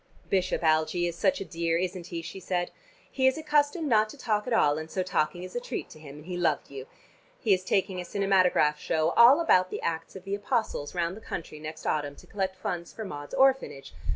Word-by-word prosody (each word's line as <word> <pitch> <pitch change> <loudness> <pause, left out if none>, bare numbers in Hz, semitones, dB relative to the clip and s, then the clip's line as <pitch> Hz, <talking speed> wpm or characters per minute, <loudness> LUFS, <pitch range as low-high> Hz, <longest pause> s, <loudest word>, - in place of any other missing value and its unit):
"Bishop 185 -2 +1
Algie 160 +2 +2
is 170 -1 -2
such 190 +2 +1
a - - -4
dear, 165 -1 -1
isn't 180 0 -3
he?" 170 -2 -5
she 170 +4 -7
said. 175 -1 -2 0.4
"He 260 -1 +2
is 265 - +2
accustomed 300 +1 +1
not 215 -4 +3
to 290 - -11
talk 215 -4 -1
at - - -3
all, 150 -9 +3
and 160 0 -7
so 185 +3 -1
talking 175 0 -1
is 185 +3 -9
a - - 0
treat 245 - -5
to - - -13
him, 145 -2 -11
and 150 +1 -12
he 180 0 -4
loved 175 -4 0
you. 135 -1 -8 0.5
He 215 -5 +3
is 185 0 0
taking 185 -1 0
a - - -5
cinematograph 185 -6 +2
show, 160 +1 +1
all 245 - +7
about 185 - +4
the - - -5
Acts 165 0 -3
of 190 - -9
the 195 +1 -4
Apostles, 200 -6 -2
round 170 +1 -1
the 220 - -11
country 160 -7 -6
next 155 +1 -8
autumn 145 -2 -1
to - - -16
collect 190 -2 -3
funds 170 -2 -4
for 220 - -7
Maud's 145 -5 -7
orphanage. 265 - +2
180 Hz, 230 wpm, -28 LUFS, 160-210 Hz, 0.5 s, all